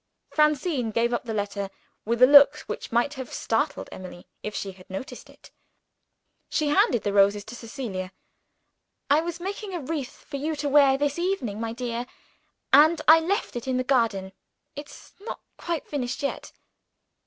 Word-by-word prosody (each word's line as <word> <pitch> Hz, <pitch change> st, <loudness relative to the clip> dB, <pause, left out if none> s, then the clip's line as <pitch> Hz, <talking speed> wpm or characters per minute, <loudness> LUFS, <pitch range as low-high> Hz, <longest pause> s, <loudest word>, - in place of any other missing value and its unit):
Francine 300 Hz, -4 st, +1 dB
gave 235 Hz, +2 st, 0 dB
up 240 Hz, -, -2 dB
the 230 Hz, -, -4 dB
letter, 200 Hz, -1 st, -3 dB, 0.4 s
with 235 Hz, +3 st, +2 dB
a -, -, +12 dB
look 285 Hz, +2 st, +7 dB
which -, -, -7 dB
might 240 Hz, +5 st, +1 dB
have 260 Hz, -3 st, -7 dB
startled 285 Hz, +6 st, -1 dB
Emily 185 Hz, -1 st, -10 dB, 0.2 s
if 210 Hz, -, -5 dB
she 195 Hz, -, -4 dB
had 185 Hz, -1 st, -17 dB
noticed 190 Hz, +7 st, -7 dB
it. -, -, -18 dB, 1.0 s
She 300 Hz, -1 st, 0 dB
handed 250 Hz, -5 st, +3 dB
the 205 Hz, -, -1 dB
roses 200 Hz, +1 st, +4 dB
to 220 Hz, +3 st, -10 dB
Cecilia. 220 Hz, -6 st, -6 dB, 1.0 s
"I 295 Hz, +2 st, +5 dB
was 340 Hz, 0 st, -5 dB
making 390 Hz, +1 st, -5 dB
a -, -, -2 dB
wreath 290 Hz, -2 st, -5 dB
for 280 Hz, -, -5 dB
you 310 Hz, +3 st, -2 dB
to 290 Hz, 0 st, -3 dB
wear 275 Hz, -1 st, +5 dB
this 290 Hz, +2 st, -1 dB
evening, 315 Hz, -, -2 dB
my 225 Hz, 0 st, -3 dB
dear 240 Hz, 0 st, -4 dB, 0.7 s
and 315 Hz, +2 st, +7 dB
I 320 Hz, +1 st, +9 dB
left 380 Hz, -, -2 dB
it 240 Hz, +1 st, -5 dB
in 260 Hz, -1 st, 0 dB
the 255 Hz, -, 0 dB
garden. 225 Hz, -8 st, +1 dB, 0.4 s
It's 290 Hz, +1 st, -11 dB
not 415 Hz, -, -7 dB, 0.2 s
quite 340 Hz, -3 st, -3 dB
finished 265 Hz, -1 st, -3 dB
yet." 280 Hz, -, -3 dB
260 Hz, 170 wpm, -25 LUFS, 225-300 Hz, 1.0 s, a